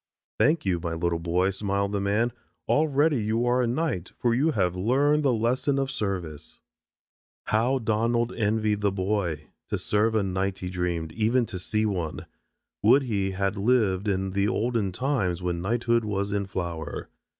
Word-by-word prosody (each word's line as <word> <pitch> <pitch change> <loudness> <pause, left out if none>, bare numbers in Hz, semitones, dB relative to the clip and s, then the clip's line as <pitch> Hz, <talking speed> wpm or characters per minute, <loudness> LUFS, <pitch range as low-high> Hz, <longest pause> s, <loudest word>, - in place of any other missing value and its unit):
"Thank 155 -1 +3
you, 90 -3 +1
my 85 -1 -3
little 85 0 0
boy," 90 +3 +1
smiled 100 0 -1
the 100 -1 -1
man. 105 +5 +1 0.4
"Already 150 -2 +2
you 110 +3 0
are 125 +1 +2
a 120 - +1
knight 120 - -2
for 120 -1 +1
you 140 +7 +2
have 90 - 0
learned 140 +10 +2
the 140 -3 +3
lesson 125 +5 +1
of 135 -1 -1
service." 90 - -4 0.8
How 120 +5 +1
Donald 115 +1 0
envied 110 -1 0
the 100 -1 +2
boy. 95 -5 -1 0.3
To - - -1
serve 110 +2 +1
a 110 - +2
knight, 95 0 -1
he 90 -1 -5
dreamed, 85 -3 -2
even 115 +6 +1
to 95 -4 -6
see 105 +4 0
one. 90 -7 -3 0.6
Would 140 - +5
he 100 -6 -1
had 95 +1 -1
lived 105 -3 +2
in 95 -1 0
the 100 +1 +1
olden 115 -3 0
times 95 -6 -1
when 85 -1 -1
knighthood 115 +3 +1
was 100 -1 -2
in 100 -1 -1
flower. 85 -5 -4
105 Hz, 170 wpm, -26 LUFS, 95-120 Hz, 0.8 s, Would